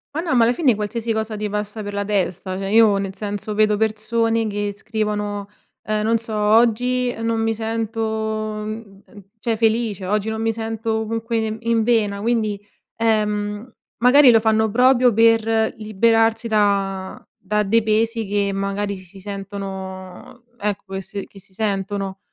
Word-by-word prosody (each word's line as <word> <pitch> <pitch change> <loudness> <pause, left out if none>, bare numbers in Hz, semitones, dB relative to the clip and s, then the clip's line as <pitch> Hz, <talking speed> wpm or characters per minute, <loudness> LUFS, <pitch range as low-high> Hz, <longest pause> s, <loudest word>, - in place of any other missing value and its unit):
Ma 320 - 0
no, 330 -6 -1
ma 235 - +5
alla 235 +2 +3
fine 255 -2 +3
qualsiasi 220 +2 -2
cosa 220 0 -2
ti 210 0 -2
passa 210 +1 -4
per 205 - -6
la 200 0 -1
testa. 190 -2 -2
Cioè, 195 0 -3
io, 220 -3 +5
nel 195 -1 -3
senso, 205 0 -4
vedo 210 0 +3
persone 225 +1 0
che 205 0 -2
scrivono, 210 -1 -3 0.4
uhm, 215 0 -1
non 225 +2 +2
so: 225 -1 -7
"Oggi 240 +4 +2
non 230 0 0
mi 225 0 +1
sento, 225 0 -3
mhmm, 215 -1 -4
uhm, 205 -1 -15 0.2
cioè, 230 +1 -1
felice, 220 -4 0
oggi 210 +1 0
non 220 0 -3
mi 225 0 +1
sento 225 0 -3
comunque 225 +1 -2
ne 220 0 -2
in 230 -1 +1
vena." 210 -4 +1
Quindi, 215 -3 0 0.4
ehm, 210 0 0 0.3
magari 250 +2 +7
lo 225 - +6
fanno 220 0 +2
proprio 250 0 +4
per 225 0 +3
liberarsi 225 +2 +2
da 200 -3 0 0.2
da 210 +2 0
dei 225 +3 +3
pesi 225 +1 +1
che 200 0 0
magari 200 0 -2
si 185 +1 -14
sentono 195 +1 -7
ecco, 200 -2 -4
che 190 - -3
s 195 +2 -6
che 200 - -15
si 195 0 -22
sentono. 195 -1 -2
215 Hz, 165 wpm, -21 LUFS, 205-225 Hz, 0.4 s, magari